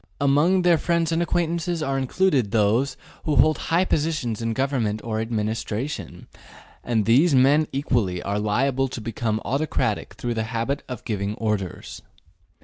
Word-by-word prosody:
Among 150 +7 +3
their 175 -2 +4
friends 170 +1 0
and 165 +1 +1
acquaintances 170 -1 -1
are 135 -2 -1
included 135 - +1
those 110 +5 +1 0.3
who 150 - +1
hold 155 +5 +4
high 170 +3 +3
positions 145 - -1
in 115 0 -1
government 125 -5 -1
or 110 -1 -2
administration, 110 - -3 0.6
and 110 -4 0
these 140 +7 +4
men 140 +4 +4
equally 120 -10 0
are 100 +1 -1
liable 130 +6 +1
to 130 - -6
become 110 -1 -2
autocratic 140 +4 -1
through 120 -1 -3
the 110 -1 -2
habit 115 +5 -2
of 125 -3 -7
giving 105 -3 -2
orders. 105 -6 -3
130 Hz, 145 wpm, -24 LUFS, 110-155 Hz, 0.6 s, their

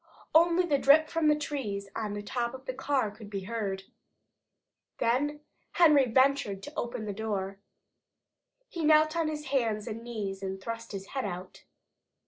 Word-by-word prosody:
Only 340 +2 +5
the 290 -5 +2
drip 310 +4 +6
from 325 -2 +1
the 300 - +5
trees 245 -10 -4
on 210 -2 -3
the 205 - -5
top 235 +3 -2
of 260 0 -12
the 255 - -3
car 265 -4 0
could 210 0 -12
be 200 -2 -4
heard. 195 -2 -3 1.1
Then 290 +5 0 0.3
Henry 300 -6 +6
ventured 260 -6 +2
to 290 - -8
open 235 -2 -3
the 205 - -3
door. 195 -2 -3 1.1
He 335 - -5
knelt 310 +1 +5
on 330 -2 +1
his 300 -1 -4
hands 220 -5 +1
and 225 0 -5
knees 205 -5 -4
and 190 0 -4
thrust 230 +3 -6
his 195 -1 -7
head 265 -4 -3
out. 185 -1 -7
235 Hz, 165 wpm, -29 LUFS, 205-295 Hz, 1.1 s, drip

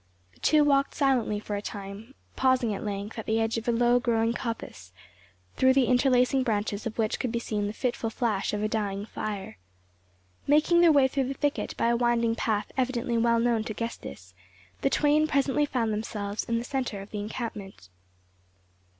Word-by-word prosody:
The - - -25
two 305 -1 +4
walked 275 -1 +2
silently 255 -7 +1
for 210 0 -5
a 200 - -3
time, 205 +5 -8 0.2
pausing 255 -4 +2
at 195 - -5
length 205 +2 -4
at 220 - -7
the 220 +1 +1
edge 225 0 0
of 225 - -12
a - - +3
low 240 +1 +3
growing 230 -1 +1
coppice, 225 - -6 0.7
through 260 0 +5
the 265 -1 +4
interlacing 250 +1 +3
branches 210 -2 -1
of 220 - -7
which 220 -2 0
could 250 - -2
be 235 - -1
seen 210 -3 -2
the - - -3
fitful 235 0 -2
flash 220 -4 -1
of 210 0 -2
a - - +2
dying 205 -2 -2
fire. 200 - -6 0.9
Making 310 +4 +4
their 340 -2 +7
way 280 -3 +5
through 265 -1 -1
the 270 - -4
thicket 290 +2 -2
by 230 - +2
a 235 - +3
winding 235 -1 +2
path 215 -2 -1
evidently 250 -2 -1
well 235 0 +3
known 230 -2 +1
to 215 - -5
Gestas, 95 - -7 0.5
the 275 - +2
twain 300 +2 +3
presently 280 0 +1
found 230 -5 -1
themselves 210 -1 -4
in 230 - 0
the 230 - -2
centre 250 -5 -3
of 195 - -12
the 210 - -4
encampment. 205 - -6
230 Hz, 190 wpm, -27 LUFS, 210-260 Hz, 0.9 s, their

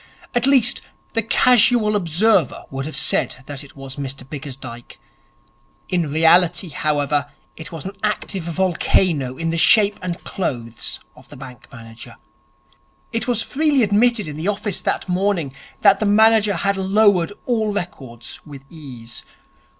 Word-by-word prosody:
At 245 +2 +2
least, 260 -4 +4 0.3
the 225 - +1
casual 225 -1 +4
observer 180 - +1
would 135 +1 -4
have 155 - -7
said 130 - -1
that 145 -1 -7
it 135 -2 -14
was 135 -1 -10
Mr 135 -2 -6
Bickersdyke. 135 -4 -9 0.9
In 175 -4 0
reality, 170 +3 +3
however, 145 -1 -1 0.3
it 160 - -10
was 165 -4 -8
an 195 +1 -6
active 210 -2 -2
volcano 170 -5 0
in 165 0 -2
the 165 - -1
shape 205 +2 +4
and 180 -1 -4
clothes 120 -9 -4 0.2
of 125 - -18
the 145 - -12
bank 130 -2 -12
manager. 115 +1 -12 1.0
It 230 +1 -3
was 235 -2 +1
freely 290 -1 +1
admitted 215 0 +2
in 150 -1 -7
the 160 +4 -4
office 205 -1 -2
that - - -2
morning 180 -6 -1 0.3
that 200 -1 +5
the 215 - 0
manager 215 -1 +4
had 200 +3 0
lowered 195 -2 +3
all 220 -4 0
records 145 - -6
with 140 -3 -12
ease. 125 -8 -9
175 Hz, 145 wpm, -20 LUFS, 140-210 Hz, 1.0 s, that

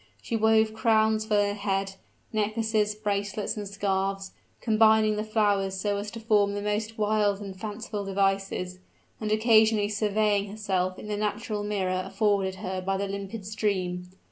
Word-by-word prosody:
She 230 - -4
wove 220 0 +3
crowns 220 -1 +2
for 215 - +1
her 205 0 +2
head 195 -1 -2 0.4
necklaces, 215 0 0
bracelets, 205 0 -2
and 210 -2 -5
scarfs, 195 -1 -2 0.3
combining 220 -1 +4
the 210 - -2
flowers 205 -3 +1
so 205 +1 0
as 205 +1 -4
to 230 - -8
form 210 -3 +2
the 205 - -3
most 210 +2 -2
wild 210 -2 +1
and 195 -2 -7
fanciful 210 +1 -5
devices, 195 -2 -1 0.4
and 215 -1 -3
occasionally 215 -1 +4
surveying 210 -1 +1
herself 190 -3 -1
in - - -9
the 210 -1 -2
natural 210 0 -2
mirror 190 -3 -1
afforded 200 -3 0
her 185 -1 -4
by 195 +1 -1
the 200 +1 -2
limpid 200 +1 -6
stream. 185 -4 -2
205 Hz, 155 wpm, -27 LUFS, 195-215 Hz, 0.4 s, combining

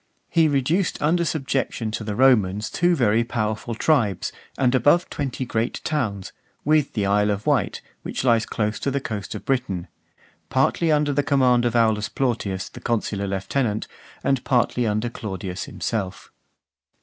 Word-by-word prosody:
He 165 -1 +4
reduced 150 +6 +1
under 170 +4 +2
subjection 135 -7 -1
to 110 - -4
the 105 -1 -3
Romans 105 -5 +3
two 175 0 +2
very 115 -5 +3
powerful 115 0 -2
tribes, 115 - +1 0.3
and 125 -1 +2
above 145 +8 +3
twenty 135 -2 -3
great 115 0 -1
towns, 110 -11 -2 0.3
with 150 -1 +2
the 105 -3 0
Isle 105 +1 +3
of 105 0 -2
Wight, - - +1 0.2
which - - -4
lies 115 -3 +3
close 105 -1 -1
to - - -1
the 140 +1 0
coast 105 -6 -5
of - - -7
Britain; 125 -10 -1 0.6
partly 165 -2 +2
under 150 -1 +2
the 145 - +2
command 130 -4 +3
of 120 -1 0
Aulus 110 -3 +2
Plautius, 105 -7 -1
the - - -11
consular 105 -4 -1
lieutenant, 105 +3 -1 0.4
and 135 -2 +1
partly 125 -2 +1
under 110 +2 0
Claudius 95 -6 -5
himself. 100 -4 -4
120 Hz, 155 wpm, -23 LUFS, 105-140 Hz, 0.6 s, He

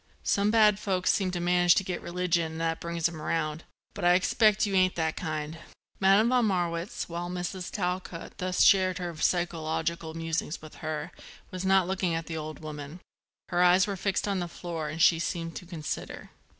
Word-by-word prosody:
Some 200 +1 +2
bad 210 -2 +5
folks 185 -3 +1
seem 195 -3 0
to 180 -1 -3
manage 175 0 +4
to - - +2
get 185 -1 -4
religion 170 -2 -1
and 160 - -6
that 165 0 -1
brings 170 -1 -1
'em 165 -2 -8
round; 155 0 -2 0.3
but - - -7
I 175 0 +6
expect 215 +3 +3
you 200 - -3
ain't 185 -1 +3
that 160 -1 -1
kind." 155 -1 -4 0.4
Madame 195 +4 +5
von 250 -2 +3
Marwitz, 175 -1 -2
while 175 +1 -4
Mrs. 180 +1 -4
Talcott 180 -3 -4
thus 185 0 +1
shared 185 -2 +5
her 175 -2 -4
psychological 165 -1 -1
musings 165 -1 -2
with 155 0 -13
her, 155 -1 -4 0.4
was 185 0 -5
not 190 -1 +4
looking 185 -3 0
at 165 0 -3
the 165 - -5
old 155 0 -5
woman: 150 +1 -7 0.5
her 175 - +1
eyes 180 +1 +6
were 200 - -3
fixed 195 +2 -1
on 200 -2 0
the 175 - -2
floor 165 -2 -5
and 165 +2 0
she 165 - +5
seemed 165 -1 -3
to 180 - -9
consider. 165 -4 -6
175 Hz, 190 wpm, -28 LUFS, 165-185 Hz, 0.5 s, I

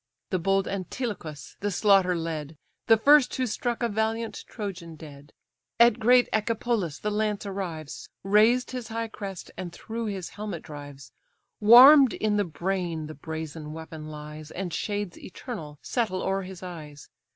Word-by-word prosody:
The 185 - +1
bold 195 +2 +1
Antilochus 185 - -5
the 205 - -1
slaughter 195 -2 +4
led, 160 -2 -4 0.3
The 225 - +7
first 285 +3 +5
who 260 - 0
struck 240 +1 -2
a - - +3
valiant 220 +1 -2
Trojan 180 -7 -6
dead: 145 -2 -12 0.5
At 235 -1 +6
great 245 +2 +5
Echepolus 220 -6 0
the 210 - -3
lance 210 -1 -1
arrives, 175 -7 -6
Razed 215 +6 +4
his 250 -3 -5
high 230 0 -3
crest, 195 -4 -7
and 180 -2 -5
through 225 +5 -5
his 195 -4 -4
helmet 205 -5 -6
drives; 145 -4 -10 0.5
Warm'd 255 +5 +9
in 210 -1 0
the 205 - +3
brain 170 -1 -3
the 155 - -7
brazen 155 0 -6
weapon 160 -1 -8
lies, 150 0 -9
And 180 -2 -5
shades 205 +1 -3
eternal 170 - -8
settle 215 -7 -1
o'er 195 0 0
his 185 -1 -9
eyes. 150 -5 -9
195 Hz, 150 wpm, -27 LUFS, 160-220 Hz, 0.5 s, Warm'd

